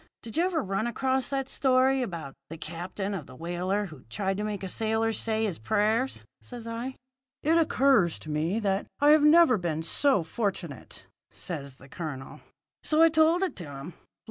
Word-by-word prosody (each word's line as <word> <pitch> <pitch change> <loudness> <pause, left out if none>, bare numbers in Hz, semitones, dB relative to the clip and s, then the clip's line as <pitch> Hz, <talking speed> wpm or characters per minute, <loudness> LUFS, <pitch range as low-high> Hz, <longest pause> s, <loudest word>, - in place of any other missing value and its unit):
Did 225 - -7
you 340 - +3
ever 360 -4 0
run 195 +3 -1
across 260 +2 0
that 270 -1 -1
story 265 -1 +3
about 165 - -5 0.2
the 165 - -7
captain 180 +5 -5
of 175 -8 -5
the - - -12
whaler 180 +6 -2
who 155 -8 -12
tried 195 - -1
to 210 - -2
make 210 -2 -3
a - - -2
sailor 220 +3 0
say 220 0 0
his 190 -6 -3
prayers?' 215 - 0 0.2
says 240 -2 -9
I. 235 +3 -4 0.5
"'It 320 +3 +3
occurs 265 - +3
to 155 - -8
me 160 +8 0
that 195 -1 0
I 290 +1 +6
have 305 0 +6
never 300 - +6
been 165 -2 -2
so 265 - +2
fortunate,' 175 - -4 0.2
says 140 -6 -6
the 135 - -16
colonel. 140 -2 -7 0.4
"So 310 +1 +4
I 330 - +7
told 320 +3 +4
it 380 - -1
to 175 - -5
him. 140 +4 -8
210 Hz, 185 wpm, -28 LUFS, 170-265 Hz, 0.5 s, I